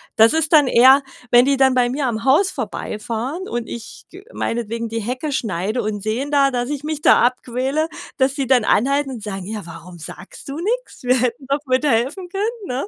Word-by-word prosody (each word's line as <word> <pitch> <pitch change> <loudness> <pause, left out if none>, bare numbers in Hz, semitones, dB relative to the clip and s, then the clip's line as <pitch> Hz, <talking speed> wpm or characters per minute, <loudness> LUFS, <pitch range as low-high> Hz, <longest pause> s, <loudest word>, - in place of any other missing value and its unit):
Das 225 +1 +6
ist 320 0 0
dann 295 -3 +6
eher 260 +3 +6 0.3
wenn 240 0 +7
die 275 0 +2
dann 265 -1 +4
bei 250 -1 +2
mir 270 +2 -1
am 225 -2 -3
Haus 320 +10 +3
vorbeifahren 240 - -4
und 240 -1 -3
ich 235 -1 -9
g 375 +2 -13
meinetwegen 230 0 -3
die 225 +1 -4
Hecke 255 +7 -3
schneide 215 0 -2
und 210 -1 -3
sehen 235 +8 -2
da, 275 -1 +3
dass 245 0 -2
ich 290 -1 -4
mich 305 -1 -3
da - - +5
abquäle, 255 +5 -1 0.3
dass 265 -1 +2
die 275 -3 -2
dann 255 -2 +4
anhalten 275 +6 +1
und 235 -5 -8
sagen: 195 -3 -5
„Ja, 210 -1 -6
warum 170 +1 -11
sagst 175 +4 -11
du 275 - -5
nix? 455 - -3
Wir 250 +1 +3
hätten 250 +3 -2
doch 280 - +1
bitte 260 +3 +1
helfen 270 +10 -1
können“, 420 +3 -3
ne? 260 +9 -3
255 Hz, 210 wpm, -20 LUFS, 230-285 Hz, 0.3 s, wenn